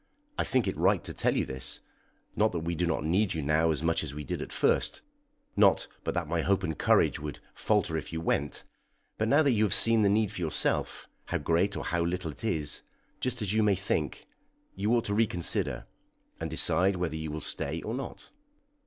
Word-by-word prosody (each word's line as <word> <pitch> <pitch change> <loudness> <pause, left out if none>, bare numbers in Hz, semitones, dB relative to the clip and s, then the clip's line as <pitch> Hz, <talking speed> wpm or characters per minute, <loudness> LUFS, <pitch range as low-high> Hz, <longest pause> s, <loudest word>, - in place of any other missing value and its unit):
I - - 0
think 130 -3 +1
it - - -1
right - - +3
to - - -6
tell - - +1
you - - +1
this; 65 0 -3 0.6
not 110 -1 +2
that 85 - -2
we 85 +1 -2
do 85 +1 0
not 80 - -1
need 90 +5 +1
you 80 - -2
now 75 +3 +2
as 75 -1 -1
much 85 0 +2
as 70 -2 -5
we 75 - -5
did - - -4
at - - -6
first; - - +1 0.5
not - - +4 0.2
but - - -2
that 85 -3 -1
my 85 +1 0
hope 95 +3 +1
and 80 -4 -2
courage - - +3
would 75 0 -6 0.2
falter 105 -6 0
if 80 - -4
you 80 - -3
went; 75 -3 -1 0.6
but 110 - +1
now 145 +6 +5
that 140 - +3
you 110 -3 +2
have 105 - +3
seen 115 -1 +5
the 100 - +4
need 105 0 +2
for 100 - -6
yourself, 80 -3 0 0.2
how - - -1
great 85 +6 +1
or - - -4
how 85 0 -1
little 85 -1 -2
it 75 - -12
is, 80 -10 -1 0.4
just 125 -3 -2
as 100 0 -1
you 110 - +3
may 105 -2 +3
think, 90 -6 -2 0.5
you 100 +3 0
ought 115 - +1
to 100 - -1
reconsider, 100 -6 0 0.5
and - - -3
decide 95 +2 +3
whether 90 -3 -2
you 80 0 -4
will 75 +1 -4
stay - - -1
or 110 - -3
not." 135 +2 -6
90 Hz, 220 wpm, -29 LUFS, 80-105 Hz, 0.6 s, now